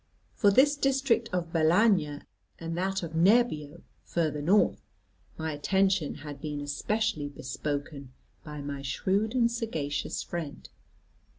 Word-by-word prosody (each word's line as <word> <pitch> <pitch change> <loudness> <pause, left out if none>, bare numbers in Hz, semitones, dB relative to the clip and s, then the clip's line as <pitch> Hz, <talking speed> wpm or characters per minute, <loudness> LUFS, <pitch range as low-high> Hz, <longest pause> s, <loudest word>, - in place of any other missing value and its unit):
For 205 - +4
this 275 +8 +5
district 270 -4 +1
of 170 -2 -2
Balagna, 165 -2 +3 0.3
and 165 0 -5
that 190 +2 -1
of 165 - -5
Nebbio 170 -4 +2 0.2
further 155 -3 -1
north, 190 +8 +3 0.6
my 160 0 -3
attention 190 +2 +1
had 145 -1 -9
been 150 -2 -4
especially 150 +3 -1
bespoken 140 0 -5 0.3
by 150 -1 -7
my 140 -1 -5
shrewd 195 - -1
and 235 -2 +3
sagacious 160 -12 -3
friend. 165 -4 -6
165 Hz, 120 wpm, -28 LUFS, 145-210 Hz, 0.6 s, this